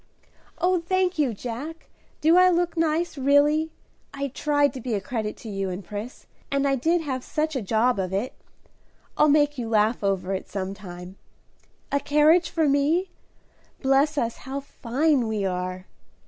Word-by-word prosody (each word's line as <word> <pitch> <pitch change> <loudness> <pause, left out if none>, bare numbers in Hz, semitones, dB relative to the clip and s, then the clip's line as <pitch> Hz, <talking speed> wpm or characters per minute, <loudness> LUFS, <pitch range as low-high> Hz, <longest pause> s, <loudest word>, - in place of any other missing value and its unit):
"Oh, 360 0 +2
thank 370 0 0
you, 280 -5 +2
Jack! 250 +9 -7 0.3
Do 320 +3 +5
I 365 0 +7
look 350 -1 +1
nice, 325 -1 0
really? 290 +3 +3 0.4
I 280 0 -3
tried 290 0 +1
to 260 - -7
be 235 -2 -2
a - - 0
credit 215 +1 -4
to - - -11
you 195 -2 -2
and 185 +1 -6
Pris, 210 +6 -7 0.2
and 280 0 +1
I 275 - +2
did 325 +7 +1
have 260 -5 -3
such 310 0 -2
a 260 - -1
job 220 +3 +1
of 185 -1 -2
it. 200 +7 -2 0.8
I'll 300 - +4
make 290 -1 +3
you 230 -2 -3
laugh 220 0 +2
over 195 -1 0
it 190 - -5
some 195 -1 -4
time. 180 -2 -10 0.7
A 280 - +2
carriage 300 +4 +4
for 325 -3 +1
me? 305 +7 +2 0.7
Bless 275 +3 +3
us, 230 -4 -1
how 270 +2 -5
fine 270 0 0
we 215 -3 -1
are!" 185 0 -3
275 Hz, 170 wpm, -25 LUFS, 210-310 Hz, 0.8 s, I